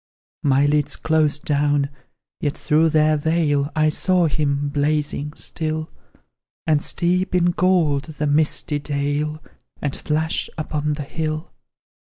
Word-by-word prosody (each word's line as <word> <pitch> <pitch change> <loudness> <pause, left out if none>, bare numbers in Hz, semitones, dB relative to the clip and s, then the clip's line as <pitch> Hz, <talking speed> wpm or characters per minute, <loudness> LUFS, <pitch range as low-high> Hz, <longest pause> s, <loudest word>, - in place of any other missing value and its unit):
My 140 0 +3
lids 145 0 +1
closed 155 -2 +1
down, 145 -1 +1 0.5
yet 145 -2 -2
through 160 +1 +3
their 155 0 +3
veil 150 -2 +1
I 155 0 +3
saw 180 +3 +2
him, 145 -2 0
blazing, 150 0 -1
still, 155 -1 -4 0.7
And 155 -2 +2
steep 180 +3 0
in 175 -1 +3
gold 170 -6 +2
the 150 - -1
misty 150 0 +1
dale, 145 +1 -2 0.4
And 145 -2 -2
flash 160 +1 -1
upon 150 -1 -1
the 145 0 -4
hill. 155 +2 -4
150 Hz, 125 wpm, -21 LUFS, 145-160 Hz, 0.7 s, My